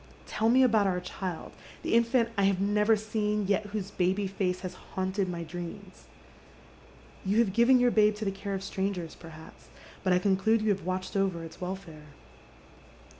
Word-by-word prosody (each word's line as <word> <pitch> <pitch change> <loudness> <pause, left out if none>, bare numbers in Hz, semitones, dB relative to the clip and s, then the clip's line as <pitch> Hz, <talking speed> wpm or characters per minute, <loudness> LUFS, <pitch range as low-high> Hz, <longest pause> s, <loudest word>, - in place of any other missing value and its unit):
Tell 220 +1 0
me 260 +2 +6
about 220 -5 +4
our 180 -1 0
child, 180 -1 -6 0.3
the - - -1
infant 235 0 +3
I 200 -1 +2
have 195 -1 +2
never 210 +2 +3
seen, 210 -1 -1
yet 205 +2 0
whose 205 -1 -4
baby 190 +2 0
face 185 -1 -2
has 185 -1 -5
haunted 190 0 -3
my 170 -1 -4
dreams. 175 +3 -8 1.2
You 195 +2 0
have 225 -5 +3
given 240 +3 +5
your 245 0 +4
babe 215 -1 +4
to 210 +1 -5
the 195 - 0
care 195 +1 -4
of 190 - -5
strangers, 190 -4 -3
perhaps, 160 -1 -13 0.4
but 185 - +2
I 180 - +5
conclude 200 +4 +2
you 215 - +1
have 195 -3 0
watched 185 +2 -3
over 190 -4 0
its 165 +2 -11
welfare. 180 -5 -7
195 Hz, 175 wpm, -29 LUFS, 185-210 Hz, 1.2 s, me